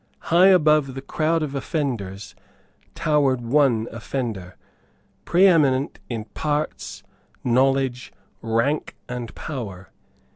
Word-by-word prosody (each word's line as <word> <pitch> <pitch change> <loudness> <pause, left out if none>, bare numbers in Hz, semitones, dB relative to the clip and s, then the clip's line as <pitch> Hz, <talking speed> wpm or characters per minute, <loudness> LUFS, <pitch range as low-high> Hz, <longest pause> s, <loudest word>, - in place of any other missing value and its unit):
High 180 +2 +7
above 155 -7 +4
the 135 - -5
crowd 160 +3 0
of 145 -2 -4
offenders 115 - -3 0.6
towered 145 -5 +2
one 120 -2 +2
offender, 110 -6 -5 0.7
preeminent 160 -7 +3
in 115 -3 -4
parts, 150 +6 -3 0.4
knowledge, 130 0 +1 0.3
rank 115 +7 0
and 120 -3 -5
power. 105 -11 -7
135 Hz, 95 wpm, -23 LUFS, 115-150 Hz, 0.7 s, High